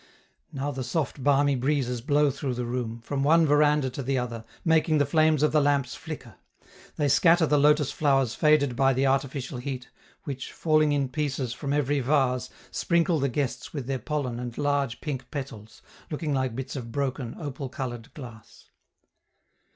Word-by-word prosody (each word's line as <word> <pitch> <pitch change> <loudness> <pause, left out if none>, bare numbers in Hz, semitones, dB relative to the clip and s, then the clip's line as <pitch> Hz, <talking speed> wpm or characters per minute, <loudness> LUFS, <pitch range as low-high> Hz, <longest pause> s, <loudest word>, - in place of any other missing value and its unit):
Now 140 +1 -3
the 130 -1 -4
soft 135 0 -2
balmy 140 0 +3
breezes 125 -2 0
blow 145 +3 +3
through 135 -2 -3
the 125 0 -3
room, 120 -1 -4
from 135 +4 -3
one 165 +3 +5
veranda 150 -2 +3
to 140 - -5
the 135 +1 -1
other, 120 -2 -4 0.2
making 160 -1 +3
the 145 - +3
flames 155 0 +3
of 150 - +3
the 155 - +4
lamps 140 -3 +1
flicker. 145 -7 -8 0.6
They 150 - +1
scatter 165 +4 +5
the 150 -1 +3
lotus 150 -1 +4
flowers 135 -5 +2
faded 150 -4 +3
by 135 +1 +3
the 130 +2 +1
artificial 135 -1 -1
heat, 130 -1 -6 0.3
which, 135 -4 -6
falling 155 -2 +2
in 140 -2 0
pieces 135 -3 -2
from 140 +1 -4
every 145 0 +1
vase, 125 -2 +1 0.2
sprinkle 170 -1 +1
the 140 0 +1
guests 135 0 -3
with 140 -5 -4
their 135 0 -2
pollen 135 -6 -3
and 120 -1 -6
large 145 -4 0
pink 135 -4 -5
petals, 110 -6 -8 0.3
looking 150 -1 -2
like 130 -3 -1
bits 135 +2 -5
of 120 -4 -6
broken, 130 -2 -3
opal 140 -3 -5
colored 120 -4 -6
glass. 120 -7 -12
140 Hz, 175 wpm, -26 LUFS, 125-150 Hz, 0.6 s, one